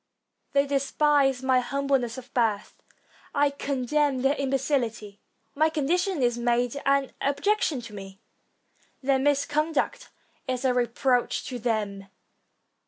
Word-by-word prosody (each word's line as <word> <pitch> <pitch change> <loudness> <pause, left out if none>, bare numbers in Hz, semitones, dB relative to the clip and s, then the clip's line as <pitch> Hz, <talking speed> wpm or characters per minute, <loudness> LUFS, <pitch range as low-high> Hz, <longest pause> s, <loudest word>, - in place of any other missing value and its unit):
They 280 0 +4
despise 275 -1 +2
my 260 -1 +3
humble 275 +2 0
ness 240 -1 -5
of 255 0 -11
birth; 220 -4 -1 0.5
I 285 0 +3
contemn 280 0 0
their 270 +1 +4
imbecility. 260 -7 -1 0.3
My 310 +2 +3
condition 330 +2 0
is 240 -1 +1
made 240 +1 +1
an 275 -1 +2
objection 300 -1 +1
to 230 -2 -11
me; 195 -1 -9 0.8
their 270 0 +2
misconduct 290 - 0 0.4
is 255 0 -2
a 255 - +3
re 245 -1 +1
proach 245 +1 0
to 250 -2 -5
them. 210 -4 -2
265 Hz, 125 wpm, -26 LUFS, 240-285 Hz, 0.8 s, They